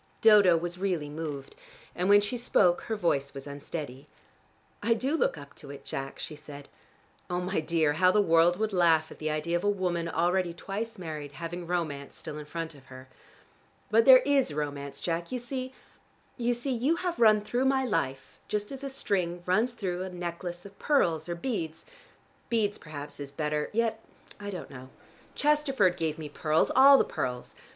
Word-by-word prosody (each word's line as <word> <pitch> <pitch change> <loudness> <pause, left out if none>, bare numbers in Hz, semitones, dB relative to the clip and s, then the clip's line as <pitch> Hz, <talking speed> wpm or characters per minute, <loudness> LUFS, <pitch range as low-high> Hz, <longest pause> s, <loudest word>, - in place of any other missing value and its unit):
Dodo 205 -6 +7
was 175 +2 -4
really 180 -7 -1
moved, 150 -3 -6 0.4
and 180 +2 0
when 205 0 +7
she 205 +4 -2
spoke 195 -7 +3
her 220 - 0
voice 140 -8 0
was 135 - -7
unsteady. 145 -1 -7 0.7
"I 230 0 +3
do 265 +7 0
look 245 - +1
up 140 -1 -11
to 145 - -11
it, 140 -1 -10
Jack," 135 0 -5
she 155 - -6
said. 145 -1 -11 0.6
"Oh, 175 0 -1
my 180 0 -1
dear, 155 -1 +1
how 180 +4 +4
the 210 - +3
world 170 -2 +4
would 215 0 -1
laugh 165 -3 +3
at - - -12
the 155 - -2
idea 155 +3 -1
of 175 - -1
a 205 - +3
woman 180 -4 -1
already 175 +1 +1
twice 210 +5 -5
married, 155 -5 -6
having 170 +3 -6
romance 155 -5 -3
still 150 - -7
in 150 - -8
front 165 +1 -5
of 135 -2 -17
her. 130 0 -12 0.8
But 225 +1 +5
there 260 -1 +9
is 275 - +2
romance, 140 -2 -4
Jack. 170 0 -2
You 255 - -1
see 255 +1 -4 0.6
you 240 -1 0
see 240 +3 -2
you 260 +7 +1
have 350 0 -3
run 215 -2 +6
through 240 +5 -1
my 265 0 +2
life 135 - -2
just 210 +2 -2
as 270 0 -7
a 275 - -3
string 180 -9 -2
runs 220 +7 +2
through 185 -5 -3
a 190 - -4
necklace 175 0 -6
of 200 0 -13
pearls 175 - +1
or 170 - -2
beads: 170 -6 -4 0.6
beads 215 -3 0
perhaps 150 -2 -8
is 140 -1 -6
better 150 +1 -2
yet 225 0 0 0.4
I 205 0 -6
don't 180 -7 -7
know. 130 -1 -10 0.5
Chesterford 280 - +2
gave 160 -3 -2
me 155 -2 -6
pearls, 155 +2 +1
all 275 +2 +9
the - - +4
pearls. 125 -1 -4
175 Hz, 190 wpm, -28 LUFS, 155-215 Hz, 0.8 s, there